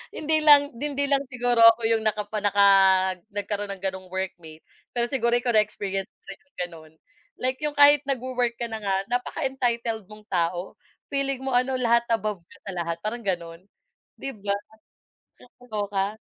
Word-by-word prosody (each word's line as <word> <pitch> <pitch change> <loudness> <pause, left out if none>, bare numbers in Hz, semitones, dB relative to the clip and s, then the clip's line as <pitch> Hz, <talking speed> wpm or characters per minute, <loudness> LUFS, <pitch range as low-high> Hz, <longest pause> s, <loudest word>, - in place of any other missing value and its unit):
Hindi 310 +1 +1
lang, 285 -1 +7
hindi 285 +1 -2
lang 280 0 +2
siguro 245 -2 0
ako 230 +1 +7
yung 225 -1 +1
nakapa 215 0 -1
naka 200 0 +4 0.7
nagkaroon 205 0 -3
ng 190 - -13
ganong 190 -1 -4
workmate. 175 -4 -6 0.3
Pero 240 0 0
siguro 235 -3 +1
ikaw 240 0 0
na-experience 195 -2 -1
mo - - -86
rin 195 - -9
yung 285 - -38
gano'n 165 -3 -8 0.4
like 260 +2 -2
yung 300 -1 -3
kahit 290 0 +7
nag-wo-work 250 -2 -1
ka 235 - -3
na 220 -1 -6
nga 195 -1 -1 0.2
napaka-entitled 240 - -2
mong 210 0 -14
tao 175 -1 -2 0.4
feeling 275 -1 0
mo 265 - -2
ano 255 +1 +2
lahat 235 -1 +3
above 210 -4 -1
ka 170 - -19
sa 195 - -4
lahat 170 -1 -3
parang 235 +3 -3
gano'n 170 -4 -4 0.6
'di 275 - -5
ba? 200 0 0 0.9
Nakakaloka. 205 -5 -4
225 Hz, 160 wpm, -25 LUFS, 195-255 Hz, 0.9 s, lang